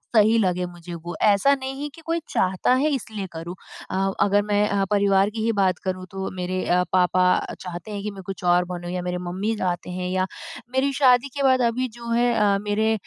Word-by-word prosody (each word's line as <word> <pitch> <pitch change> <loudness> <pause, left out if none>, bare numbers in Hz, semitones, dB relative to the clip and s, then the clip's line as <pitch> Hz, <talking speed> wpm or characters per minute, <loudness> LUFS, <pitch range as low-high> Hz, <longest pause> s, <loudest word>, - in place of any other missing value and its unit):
सही 220 +2 +5
लगे 180 -3 +1
मुझे 175 0 -9
वो 175 - -5
ऐसा 210 +7 +5
नहीं 270 +1 -6
है 295 - -2
कि 330 - -13
कोई 330 +1 0
चाहता 185 +6 +1
है 280 +4 +2
इसलिए 220 -7 -3
करूँ। 165 +2 -6 0.4
अ, - - -2 0.3
अगर 205 0 +4
मैं 210 0 +2
अ, 200 -1 +1
परिवार 200 -1 +3
की 220 0 -4
ही 230 - +2
बात 185 -2 +2
करूँ 185 -1 -3
तो 190 0 -4
मेरे 185 0 -2
अ, 180 +1 +3
पापा 185 0 +3 0.4
चाहते 180 +3 -7
हैं 205 -1 -4
कि 210 - -3
मैं 195 -1 -10
कुछ 190 -1 -7
और 175 0 +3
बनूँ 175 0 -5
या 180 0 -2
मेरे 180 0 -2
मम्मी 195 +5 -1
चाहते 180 -2 -2
हैं 180 0 -2
या 185 0 +1 0.5
मेरी 265 +2 +2
शादी 255 -1 +5
के 280 - 0
बाद 260 -1 +4
अभी 255 +2 -1
जो 235 0 -8
है 235 +1 +3
अ, 205 -2 +3
मेरे 215 +2 +1
200 Hz, 220 wpm, -23 LUFS, 180-230 Hz, 0.5 s, सही